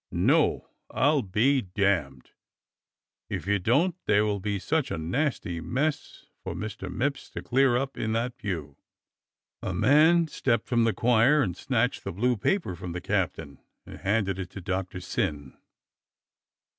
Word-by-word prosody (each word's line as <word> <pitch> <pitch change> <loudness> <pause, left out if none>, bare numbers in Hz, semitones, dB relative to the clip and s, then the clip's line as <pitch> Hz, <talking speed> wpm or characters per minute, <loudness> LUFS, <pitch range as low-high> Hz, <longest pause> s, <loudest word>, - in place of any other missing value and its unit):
" - - -58 0.2
No. - - +1 0.2
I'll 145 +1 +2
be 125 +8 +2
damned 90 - -1 0.5
" - - -65
*'If - - -4
you 100 0 +1
don't 140 - +2
there 105 0 +4
will 105 -1 -1
be 100 +1 -2
such 155 - -1
a - - -3
nasty 90 - -2
mess 140 - -2 0.2
for - - -5
IVIister 95 -1 -6
Mipps 135 +9 -2
to - - -6
clear 130 -1 +3
up 135 +1 -3
in 110 0 -1
that 120 +2 -1
pew!" 80 -8 -5 0.8
A - - -3
man 160 +4 +5
stepped 115 -7 0
from 120 -4 +2
the 115 - +2
choir 125 +5 +4
and 90 -5 -2
snatched - - -1
the - - -4
blue 120 +7 +1
paper 170 - -1
from 85 0 -7
the 90 - -3
captain 70 -5 -2 0.3
and - - -11
handed 100 -1 0
it 95 -2 -5
to 95 - -9
Doctor 95 0 -3
Syn. 70 -5 -3
105 Hz, 160 wpm, -27 LUFS, 90-135 Hz, 0.8 s, man